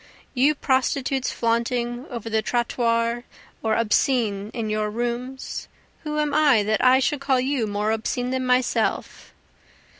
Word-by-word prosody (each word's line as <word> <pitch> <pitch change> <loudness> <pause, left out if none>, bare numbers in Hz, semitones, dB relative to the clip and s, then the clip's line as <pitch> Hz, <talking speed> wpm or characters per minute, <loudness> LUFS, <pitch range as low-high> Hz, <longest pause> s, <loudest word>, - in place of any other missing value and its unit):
You 280 +4 +3
prostitutes 265 0 0
flaunting 240 +2 -1
over 235 -4 -6
the 220 -1 +1
trottoirs 235 0 0 0.4
or 220 -1 +1
obscene 220 -3 +1
in 230 -3 -3
your 215 0 -1
rooms, 240 +4 -4 0.3
Who 300 -1 -4
am 300 -1 0
I 285 -8 +4
that 215 +1 0
I 255 +1 +6
should 275 +2 0
call 265 -2 +2
you 260 -3 0
more 205 +1 -1
obscene 245 +3 -2
than 260 0 -1
myself? 250 0 0
240 Hz, 140 wpm, -23 LUFS, 225-260 Hz, 0.4 s, I